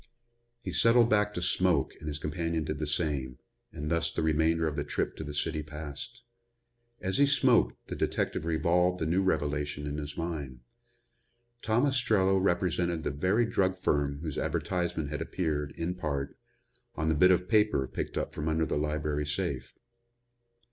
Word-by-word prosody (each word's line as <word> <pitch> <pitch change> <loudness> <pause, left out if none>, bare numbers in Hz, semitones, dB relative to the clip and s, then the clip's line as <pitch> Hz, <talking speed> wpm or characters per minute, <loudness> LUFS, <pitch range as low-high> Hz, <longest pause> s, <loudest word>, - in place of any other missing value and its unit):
He - - -4
settled 115 0 +5
back 105 -1 +3
to 90 - -2
smoke - - +2
and 75 - -8
his 75 -1 -3
companion 80 +2 -2
did 75 0 -4
the 75 - -2
same, 70 -5 -1 0.3
and 75 +2 -5
thus 85 0 +2
the - - -2
remainder 80 +1 +2
of 75 - -2
the 75 - -1
trip 75 - -2
to - - -5
the 75 - -6
city 75 +1 -1
passed. 75 - -7 0.8
As 95 +7 -1
he 140 - +6
smoked 125 - +3
the - - -4
detective - - -1
revolved 85 +2 +2
the 80 - -1
new 85 +4 +2
revelation 75 -5 -1
in 75 +1 -3
his 75 0 -7
mind. 75 -7 -4 1.0
Tom 115 +5 +2
Ostrello 110 -8 +3
represented 85 -3 0
the - - -1
very 95 - +2
drug 95 -4 +1
firm 70 -4 0
whose 80 -3 -3
advertisement 85 -5 -1
had 75 0 -3
appeared, 80 -4 -2
in 85 +2 -2
part, 70 -6 -3 0.6
on 80 +1 -1
the 80 - +3
bit 90 +5 +5
of 90 0 +3
paper 105 - +3
picked - - -4
up - - -2
from 75 - -4
under 80 0 +1
the 75 - -1
library 75 -1 -1
safe. 75 - -3
80 Hz, 170 wpm, -29 LUFS, 75-90 Hz, 1.0 s, he